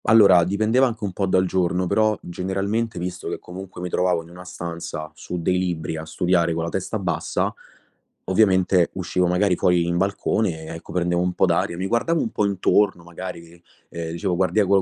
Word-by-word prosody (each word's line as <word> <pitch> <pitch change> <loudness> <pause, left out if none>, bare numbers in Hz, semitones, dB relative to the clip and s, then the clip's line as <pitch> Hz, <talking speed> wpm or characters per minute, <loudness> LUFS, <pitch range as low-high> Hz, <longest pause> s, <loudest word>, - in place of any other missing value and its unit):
Allora, 100 -5 +7
dipendeva 110 +8 +2
anche 115 -3 -6
un 100 -3 -2
po' 95 +1 -1
dal 95 0 +3
giorno, 90 0 0
però 110 +3 +2
generalmente, 100 +5 -2
visto 90 0 -4
che - - -3
comunque 95 0 -9
mi 90 - -3
trovavo 90 -2 +1
in 80 - -16
una 90 +1 -11
stanza, 85 -3 -6
su 85 +3 -6
dei 90 +2 +1
libri 85 -4 -2
a 80 0 -6
studiare 85 0 +1
con 85 - -1
la 85 - -2
testa 95 +5 -3
bassa, 85 -5 -1 0.7
ovviamente 95 -2 +3
uscivo 90 0 0
magari 90 +1 +2
fuori 90 -1 +2
in 85 0 0
balcone 95 -2 0
e 80 +1 -7
ecco, 80 - -10
prendevo 90 -1 +1
un 90 0 0
po' - - +3
d'aria, 85 - 0
mi 95 - -2
guardavo 120 +11 +1
un 115 - -1
po' 105 - 0
intorno 100 -1 +2
magari, 85 -1 -9 0.3
ehm, 85 -1 -5
dicevo: 90 +1 -1
"Guardia 95 +4 +2
gu 100 0 +3
90 Hz, 195 wpm, -23 LUFS, 85-100 Hz, 0.7 s, Allora